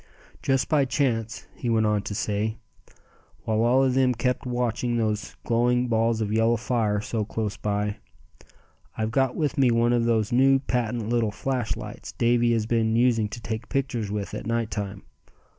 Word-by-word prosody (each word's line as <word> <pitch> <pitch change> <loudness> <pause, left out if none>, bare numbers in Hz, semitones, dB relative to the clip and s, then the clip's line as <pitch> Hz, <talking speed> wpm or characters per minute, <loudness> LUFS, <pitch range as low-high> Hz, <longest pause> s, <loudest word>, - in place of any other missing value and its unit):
"Just 135 -2 +1
by 150 -3 +3
chance," 120 -5 -1
he 120 - -4
went 110 -1 +2
on 105 -1 +2
to 105 - -5
say, 105 +2 -1 0.9
while 110 0 0
all 125 +3 +4
of 130 -1 +2
them 130 -1 +3
kept 125 +2 -1
watching 120 -1 -1
those 110 -2 -2
glowing 120 +1 +2
balls 115 0 +1
of 105 -1 -1
yellow 115 +1 +3
fire 110 -3 0
so 110 0 -2
close 105 -1 -3
by, 105 +1 -2 1.0
"I've 110 0 -1
got 130 +1 +1
with 150 -4 -1
me 130 -2 +5
one 120 +1 +3
of 120 -1 +2
those 110 -3 +1
new 135 +2 +5
patent 120 -4 -2
little 120 -2 +1
flashlights 120 +2 -4
Davy 120 0 +2
has 110 -2 0
been 115 -1 +1
using 115 -3 +2
to 120 - -8
take 110 0 -5
pictures 125 -6 -1
with 105 -1 -4
at - - -5
night 115 -1 -1
time. 100 -2 -4
115 Hz, 175 wpm, -25 LUFS, 110-125 Hz, 1.0 s, me